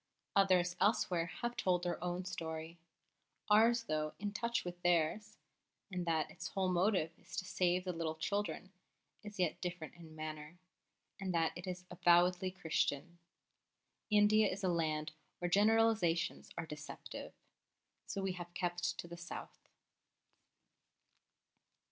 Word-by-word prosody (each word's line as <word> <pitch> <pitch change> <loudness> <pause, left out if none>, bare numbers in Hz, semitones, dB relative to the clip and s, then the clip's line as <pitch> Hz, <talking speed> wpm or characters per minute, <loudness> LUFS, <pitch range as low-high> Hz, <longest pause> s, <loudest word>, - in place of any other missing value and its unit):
Others 185 -3 +4
elsewhere 180 -5 +2
have 240 +7 -4
told 180 -1 +1
their 175 -1 -2
own 180 +1 -2
story; 160 -1 -5 0.7
ours, 230 +2 +6
though 155 -6 -2
in 205 0 -3
touch 235 0 -1
with 175 0 -6
theirs 175 +4 +1 0.5
(in 180 -1 -2
that 160 -2 +1
its 175 - -6
whole 190 -1 0
motive 180 -2 +2
is - - -11
to 185 - -2
save 180 0 +1
the 180 -1 -2
little 165 -1 -2
children), 200 +3 -2 0.5
is 210 -1 -8
yet 180 -4 0
different 175 -3 -4
in 165 -2 -13
manner, 155 +1 -6 0.6
in 195 -1 -3
that 165 -1 +2
it 175 +2 -7
is 180 0 -5
avowedly 180 +1 +4
Christian. 170 -2 -1 0.9
India 210 0 +5
is 195 +2 -5
a 185 - +3
land 155 -2 0 0.3
where 175 - -2
generalisations 210 -4 +3
are 165 - -2
deceptive. 150 -1 -8 0.7
So 195 - -3
we 195 - 0
have 175 -1 -8
kept 175 0 -1
to - - -6
the 170 0 -8
South. 175 +1 -8
175 Hz, 135 wpm, -36 LUFS, 165-195 Hz, 0.9 s, ours